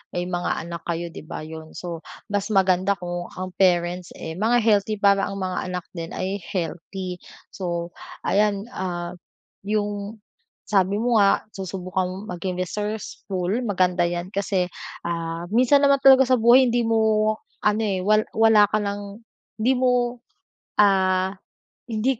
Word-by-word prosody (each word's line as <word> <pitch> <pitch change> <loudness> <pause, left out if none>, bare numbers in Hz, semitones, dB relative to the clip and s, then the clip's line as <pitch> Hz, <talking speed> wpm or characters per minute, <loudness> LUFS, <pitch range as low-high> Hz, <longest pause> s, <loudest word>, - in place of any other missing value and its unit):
may 175 0 -1
mga 175 -2 -2
anak 170 0 -6
kayo, 170 0 -2
'di - - -8
ba, 155 - -6
yun. 160 0 -9
So, 170 -2 -6 0.3
mas 205 +1 -1
maganda 190 -1 +3
kung 175 -1 -5
ang 185 0 -5
parents, 175 -1 +1
eh, 160 - -6
mga 225 +7 +2
healthy 215 -1 +3
para 200 -1 +3
ang 195 - -5
mga 185 -1 -3
anak 180 -1 -4
din 165 -2 -5
ay 190 +2 -3
healthy. 180 0 -5 0.3
So, 170 -2 -4 0.3
ayan, 205 0 +2
ah, 175 -2 -4 0.5
yung, 205 0 -2 0.4
sabi 195 -1 +2
mo 235 +1 +2
nga 195 0 +3
susubukang 185 0 -3
maging 180 -1 -4
resourceful, 195 -1 -3
maganda 185 -4 +1
'yan 175 +3 -5
kasi, 195 -2 0 0.4
ah, 165 0 -3
minsan 255 +4 +5
naman 280 -1 +4
talaga 265 -1 +8
sa 255 0 +3
buhay 240 +3 +6
hindi 240 +1 +2
mo, 220 -1 +3 0.3
ano, 210 +1 +2
eh, 195 -3 -1
wal 215 +3 +3
wala 220 -2 +6
ka 215 - +1
lang, 200 +1 -5 0.4
hindi 255 +4 +4
mo, 250 -1 +1 0.6
ah, 190 -1 +3 0.5
hindi 230 +3 0
195 Hz, 145 wpm, -23 LUFS, 180-215 Hz, 0.6 s, talaga